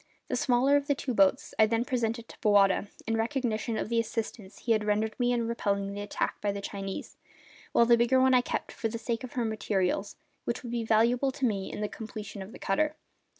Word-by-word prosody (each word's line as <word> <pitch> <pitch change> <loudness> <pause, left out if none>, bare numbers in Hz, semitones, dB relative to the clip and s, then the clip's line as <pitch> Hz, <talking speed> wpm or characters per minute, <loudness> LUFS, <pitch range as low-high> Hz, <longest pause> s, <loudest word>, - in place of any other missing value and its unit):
The - - 0
smaller 265 +3 +3
of 285 0 -3
the 285 - +2
two 265 -1 -3
boats 215 +8 +3
I 220 - +7
then 230 +2 0
presented 235 -3 -1
to - - -14
Bowata, 205 -2 +4 0.2
in 225 - 0
recognition 230 -2 -1
of - - -2
the 235 -1 +2
assistance 220 -3 -4
he 235 - -2
had 215 -1 +3
rendered 215 +1 +1
me 245 0 +2
in 235 -2 0
repelling 200 -4 -1
the 205 - -5
attack 205 - -2
by 205 - +1
the 200 - -4
Chinese, 195 -1 -6 0.5
while 235 - +5
the 235 0 +6
bigger 240 +3 +4
one 260 0 +5
I 250 - +6
kept, - - -3
for 225 - -2
the 225 +1 -4
sake 230 +1 -3
of 255 - -7
her 240 -2 0
materials, 200 -3 -1 0.3
which 235 - -3
would 240 - -6
be 235 -1 -1
valuable 235 +4 +3
to 270 - -1
me 200 -5 -1
in - - -5
the 210 - 0
completion 215 -2 -7
of 190 +3 -8
the 265 - -10
cutter. 300 +10 0
225 Hz, 230 wpm, -29 LUFS, 210-245 Hz, 0.5 s, I